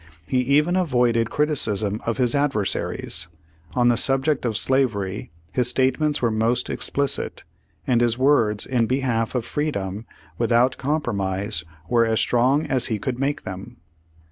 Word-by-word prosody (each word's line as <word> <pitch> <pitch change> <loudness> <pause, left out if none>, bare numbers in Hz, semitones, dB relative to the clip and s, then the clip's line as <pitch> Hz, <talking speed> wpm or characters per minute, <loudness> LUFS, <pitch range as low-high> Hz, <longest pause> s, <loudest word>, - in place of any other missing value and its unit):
He 130 - 0
even 145 +7 +2
avoided 120 - +1
criticism 110 -9 0
of 115 - -1
his 125 -3 +1
adversaries. 135 -10 -1 0.5
On 120 -1 +4
the 120 - +3
sub 135 0 +3
ject 150 -5 0
of 110 -3 0
slavery 110 -8 +1 0.2
his 125 -2 +1
statements 130 +3 +1
were 115 - +2
most 115 +3 0
explicit,, 140 -1 -1 0.4
and 120 -2 +2
his 120 -1 +2
words 120 -6 +2
in 120 -3 0
behalf 125 -3 -1
of 120 -2 -1
freedom 110 -8 -3 0.3
without 120 +2 +2
com 150 +3 0
promise, 100 -3 -2 0.2
were 120 -1 +3
as 110 0 +1
strong 130 +6 +2
as 130 -4 +1
he 110 -4 -1
could 120 +5 -4
make 145 +2 -1
them. 95 0 -8
120 Hz, 150 wpm, -23 LUFS, 110-135 Hz, 0.5 s, On